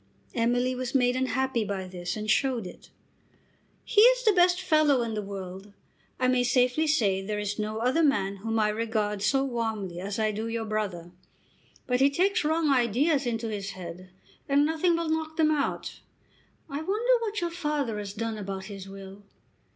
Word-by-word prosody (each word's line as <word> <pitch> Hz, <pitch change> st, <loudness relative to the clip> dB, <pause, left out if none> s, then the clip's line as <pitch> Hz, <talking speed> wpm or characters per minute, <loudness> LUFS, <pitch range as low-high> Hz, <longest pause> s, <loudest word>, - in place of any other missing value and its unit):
Emily 245 Hz, +2 st, +1 dB
was 255 Hz, +1 st, -4 dB
made 250 Hz, -1 st, +3 dB
unhappy 260 Hz, -1 st, 0 dB
by 195 Hz, -2 st, -4 dB
this 180 Hz, +1 st, -5 dB
and 215 Hz, 0 st, -5 dB
showed 245 Hz, -1 st, +1 dB
it. 180 Hz, -, -11 dB, 0.9 s
"He 425 Hz, -3 st, +4 dB
is -, -, +5 dB
the 430 Hz, -, +6 dB
best 355 Hz, 0 st, +4 dB
fellow 305 Hz, -7 st, +3 dB
in 230 Hz, -1 st, -3 dB
the 210 Hz, -, -2 dB
world. 195 Hz, 0 st, -8 dB, 0.5 s
I 255 Hz, -, +2 dB
may 255 Hz, -1 st, +3 dB
safely 250 Hz, +5 st, +2 dB
say 205 Hz, -11 st, +2 dB
there 210 Hz, +2 st, -3 dB
is 205 Hz, 0 st, -3 dB
no 215 Hz, +1 st, -2 dB
other 250 Hz, +8 st, +1 dB
man 200 Hz, -10 st, +1 dB
whom 225 Hz, +3 st, -2 dB
I 215 Hz, -1 st, +3 dB
regard 210 Hz, -2 st, -1 dB
so 270 Hz, +6 st, +2 dB
warmly 220 Hz, -8 st, -3 dB
as 200 Hz, +2 st, -4 dB
I 215 Hz, -1 st, +1 dB
do 215 Hz, +2 st, -4 dB
your 230 Hz, 0 st, -3 dB
brother. 200 Hz, -6 st, -3 dB, 0.7 s
But 250 Hz, 0 st, 0 dB
he 275 Hz, +1 st, +5 dB
takes 370 Hz, +7 st, +1 dB
wrong 315 Hz, 0 st, +1 dB
ideas 270 Hz, +3 st, +2 dB
into 230 Hz, -1 st, -2 dB
his 200 Hz, -2 st, -4 dB
head, 180 Hz, 0 st, -9 dB, 0.4 s
and 285 Hz, +1 st, +4 dB
nothing 320 Hz, +2 st, +2 dB
will 335 Hz, 0 st, -2 dB
knock 315 Hz, 0 st, -2 dB
them 310 Hz, -1 st, +4 dB
out. 290 Hz, -2 st, -2 dB, 0.7 s
I 280 Hz, +2 st, -4 dB
wonder 430 Hz, +9 st, +1 dB
what 425 Hz, -2 st, -2 dB
your 345 Hz, -2 st, -2 dB
father 295 Hz, -10 st, -2 dB
has 200 Hz, -1 st, -6 dB
done 220 Hz, 0 st, -3 dB
about 195 Hz, -1 st, -5 dB
his 195 Hz, -1 st, -9 dB
will." 195 Hz, 0 st, -10 dB
235 Hz, 180 wpm, -27 LUFS, 205-295 Hz, 0.9 s, the